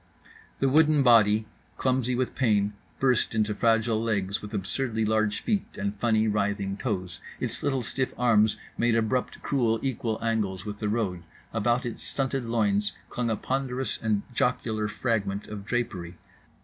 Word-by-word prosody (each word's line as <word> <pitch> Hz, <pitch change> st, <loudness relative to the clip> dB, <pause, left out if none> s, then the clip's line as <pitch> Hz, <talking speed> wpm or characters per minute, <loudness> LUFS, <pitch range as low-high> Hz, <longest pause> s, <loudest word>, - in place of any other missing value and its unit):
—The 135 Hz, -, +2 dB
wooden 150 Hz, +1 st, +5 dB
body, 110 Hz, -3 st, +5 dB, 0.3 s
clumsy 125 Hz, -1 st, +1 dB
with 130 Hz, 0 st, -1 dB
pain, 105 Hz, -5 st, +2 dB, 0.3 s
burst 125 Hz, -4 st, +2 dB
into 105 Hz, -1 st, +1 dB
fragile 115 Hz, 0 st, +2 dB
legs 100 Hz, -4 st, -1 dB
with 105 Hz, -, -8 dB
absurdly 110 Hz, +3 st, -1 dB
large 110 Hz, -1 st, +1 dB
feet 210 Hz, -4 st, -2 dB
and 100 Hz, +1 st, -2 dB
funny 110 Hz, -1 st, +2 dB
writhing 100 Hz, -1 st, 0 dB
toes; 95 Hz, -6 st, -3 dB, 0.2 s
its -, -, -2 dB
little 135 Hz, -3 st, 0 dB
stiff 130 Hz, +2 st, -1 dB
arms 110 Hz, -3 st, +4 dB, 0.2 s
made 120 Hz, -1 st, +3 dB
abrupt 115 Hz, +3 st, -1 dB
cruel 120 Hz, -5 st, +1 dB
equal 120 Hz, -4 st, -1 dB
angles 105 Hz, -4 st, -1 dB
with 105 Hz, -1 st, -6 dB
the 105 Hz, -, -1 dB
road. 105 Hz, -6 st, -1 dB, 0.3 s
About 120 Hz, +3 st, +1 dB
its 120 Hz, -, -5 dB
stunted 135 Hz, -2 st, -2 dB
loins 105 Hz, -3 st, +1 dB, 0.2 s
clung 120 Hz, -1 st, -1 dB
a 110 Hz, -, +1 dB
ponderous 130 Hz, -1 st, -2 dB
and 105 Hz, -2 st, 0 dB
jocular 110 Hz, -3 st, 0 dB
fragment 105 Hz, -2 st, -1 dB
of 105 Hz, -2 st, -7 dB
drapery. 95 Hz, -8 st, -3 dB
110 Hz, 150 wpm, -27 LUFS, 105-125 Hz, 0.3 s, wooden